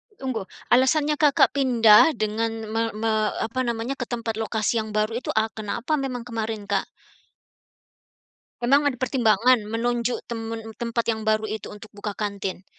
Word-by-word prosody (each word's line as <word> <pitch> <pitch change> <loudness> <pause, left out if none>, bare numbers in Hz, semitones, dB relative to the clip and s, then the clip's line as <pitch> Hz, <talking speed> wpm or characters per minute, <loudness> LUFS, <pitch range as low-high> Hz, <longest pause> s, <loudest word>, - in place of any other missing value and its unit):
Tunggu, 255 - -4 0.2
alasannya 290 +4 +3
Kakak 295 -3 +4
pindah 245 0 +5
dengan 220 +1 -1 0.2
me 225 - +1
me 220 +1 0 0.3
apa 230 +3 -3
namanya, 235 +3 -2
ke 250 - -2
tempat 230 -2 -3
lokasi 220 +1 0
yang 220 0 -4
baru 215 +1 +1
itu, - - -8
e 220 - +4
kenapa 220 +6 -5
memang 250 -3 -3
kemarin, 225 -3 -4
Kak? 195 - +1 1.7
Memang 280 +4 +4
ada 255 - -6
pertimbangan, 240 -3 +2
menunjuk 240 +1 -1
temen 225 -1 -6
tempat 235 0 -1
yang 220 -1 -1
baru 215 0 +1
itu 215 +1 -5
untuk 210 +1 -12
buka 205 0 -6
kantin? 200 -3 -4
225 Hz, 150 wpm, -24 LUFS, 215-250 Hz, 1.7 s, pindah